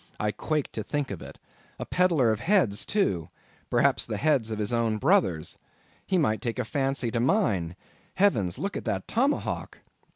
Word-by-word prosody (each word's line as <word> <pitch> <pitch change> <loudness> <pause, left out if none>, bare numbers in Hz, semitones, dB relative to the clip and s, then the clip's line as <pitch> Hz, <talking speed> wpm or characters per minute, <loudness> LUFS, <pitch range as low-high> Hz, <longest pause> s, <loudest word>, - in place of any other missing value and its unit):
I 105 0 0
quaked 150 +8 -2
to 110 - -3
think 145 +4 -3
of 95 - -6
it. - - -10 0.4
A - - -5
peddler 165 -10 +3
of 110 - -1
heads 165 - +2
too—perhaps 95 - 0
the - - -3
heads 140 -8 +2
of 110 - -3
his 105 +2 -2
own 115 -2 +1
brothers. 130 - +1 0.5
He 190 - +2
might 110 -10 +1
take 120 -2 -3
a 125 - -1
fancy 135 -1 -1
to 115 - -1
mine—heavens! 110 - 0
look 200 +1 -3
at - - -5
that - - -2
tomahawk! 275 +5 -1
125 Hz, 165 wpm, -27 LUFS, 105-175 Hz, 0.5 s, peddler